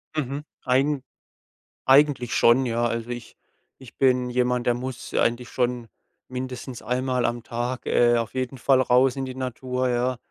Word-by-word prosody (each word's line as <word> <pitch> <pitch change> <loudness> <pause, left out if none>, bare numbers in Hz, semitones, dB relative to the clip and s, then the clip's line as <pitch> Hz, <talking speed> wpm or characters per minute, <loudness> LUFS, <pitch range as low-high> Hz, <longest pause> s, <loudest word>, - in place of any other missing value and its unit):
Mhm. 145 0 -2 0.2
Eigen 135 +2 +1 0.8
eigentlich 135 -2 +4
schon, 130 +3 +5
ja. 120 0 0
Also, 115 0 -2
ich 120 -1 -7 0.4
ich 130 -3 -15
bin 125 -2 +3
jemand, 125 0 0
der 120 - +4
muss 125 +1 -6
eigentlich 120 +1 0
schon 125 -2 -1 0.4
mindestens 125 -1 -6
einmal 125 0 -1
am 120 0 -2
Tag, 120 +2 -4
äh, 120 0 +4
auf 115 -1 -3
jeden 130 0 -3
Fall 130 +1 +3
raus 125 +1 +3
in 135 - -3
die 130 0 -7
Natur, 130 0 -2
ja. 125 +1 0
125 Hz, 155 wpm, -24 LUFS, 120-130 Hz, 0.8 s, schon